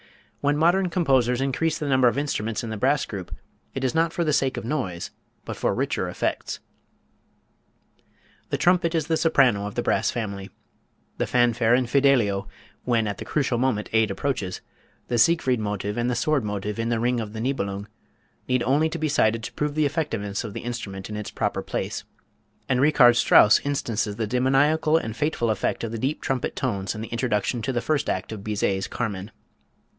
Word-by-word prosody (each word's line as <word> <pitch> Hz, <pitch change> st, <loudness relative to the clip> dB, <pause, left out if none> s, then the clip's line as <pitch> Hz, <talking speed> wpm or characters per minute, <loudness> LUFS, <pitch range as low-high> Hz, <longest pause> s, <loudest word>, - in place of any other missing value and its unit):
When 145 Hz, +1 st, +1 dB
modern 175 Hz, +4 st, +3 dB
composers 130 Hz, -8 st, +2 dB
increase 155 Hz, +4 st, 0 dB
the 150 Hz, -, -4 dB
number 130 Hz, -2 st, +4 dB
of 120 Hz, -, +1 dB
instruments 115 Hz, -7 st, -2 dB
in 115 Hz, -, -5 dB
the 110 Hz, -, -4 dB
brass 135 Hz, +6 st, +2 dB
group, 95 Hz, -4 st, -7 dB, 0.4 s
it 135 Hz, -, -3 dB
is 130 Hz, -, +1 dB
not 165 Hz, +1 st, +2 dB
for 170 Hz, -, -1 dB
the 155 Hz, -2 st, +1 dB
sake 135 Hz, -2 st, +1 dB
of -, -, -5 dB
noise, 100 Hz, -, -3 dB, 0.3 s
but -, -, -5 dB
for -, -, 0 dB
richer -, -, -1 dB
effects. -, -, -3 dB, 1.9 s
The -, -, 0 dB
trumpet 175 Hz, -1 st, +2 dB
is 160 Hz, -2 st, +1 dB
the 160 Hz, 0 st, +1 dB
soprano 125 Hz, -11 st, +3 dB
of 105 Hz, -, -8 dB
the -, -, -1 dB
brass -, -, +1 dB
family. 100 Hz, -4 st, -4 dB, 0.7 s
The -, -, 0 dB
fanfare 120 Hz, -1 st, +3 dB
in 125 Hz, 0 st, +2 dB
"Fidelio" 120 Hz, -6 st, +2 dB, 0.4 s
when 115 Hz, -3 st, +1 dB
at 100 Hz, -1 st, -4 dB
the -, -, -6 dB
critical 130 Hz, -5 st, 0 dB
moment 125 Hz, -5 st, 0 dB
aid 110 Hz, -1 st, +3 dB
approaches; 100 Hz, -3 st, -3 dB, 0.5 s
the 120 Hz, -, 0 dB
Siegfried 130 Hz, -3 st, +3 dB
Motive 105 Hz, -1 st, -3 dB
and 120 Hz, +1 st, 0 dB
the 125 Hz, -, 0 dB
Sword 140 Hz, +3 st, +1 dB
Motive, 105 Hz, 0 st, -3 dB
in 115 Hz, 0 st, -1 dB
the 120 Hz, -1 st, 0 dB
"Ring 120 Hz, +1 st, +1 dB
of 110 Hz, -2 st, -5 dB
the 110 Hz, -, -5 dB
Nibelung," 100 Hz, -5 st, -2 dB, 0.6 s
need 125 Hz, -1 st, +1 dB
only 145 Hz, +5 st, +2 dB
be 155 Hz, 0 st, -2 dB
cited 115 Hz, -6 st, +2 dB
to -, -, -6 dB
prove 150 Hz, 0 st, -2 dB
the 155 Hz, -1 st, +2 dB
effectiveness 115 Hz, -10 st, -2 dB
of 105 Hz, -3 st, -6 dB
the -, -, -5 dB
instrument 105 Hz, -5 st, -6 dB
in -, -, -4 dB
its 105 Hz, 0 st, -5 dB
proper -, -, -2 dB
place; -, -, -4 dB, 0.6 s
and 130 Hz, -1 st, +1 dB
Richard 135 Hz, -4 st, +6 dB
Strauss 105 Hz, -2 st, +6 dB
instances 115 Hz, -7 st, -1 dB
the 110 Hz, +1 st, -2 dB
demoniacal 135 Hz, +7 st, +3 dB
and 110 Hz, -9 st, -4 dB
fateful 140 Hz, -5 st, 0 dB
effect 105 Hz, -, -1 dB
of 115 Hz, -, -3 dB
the 115 Hz, -, -4 dB
deep 135 Hz, +6 st, -1 dB
trumpet 130 Hz, -3 st, -2 dB
tones 100 Hz, 0 st, -2 dB
in 110 Hz, -, -6 dB
the 110 Hz, -, -6 dB
introduction 115 Hz, 0 st, -1 dB
to 115 Hz, -, -2 dB
the 120 Hz, -2 st, -1 dB
first 150 Hz, +4 st, 0 dB
act 95 Hz, -, -2 dB
of 105 Hz, -3 st, -7 dB
Bizet's 100 Hz, -2 st, -1 dB
"Carmen." 105 Hz, -4 st, -4 dB
120 Hz, 190 wpm, -24 LUFS, 105-140 Hz, 1.9 s, Richard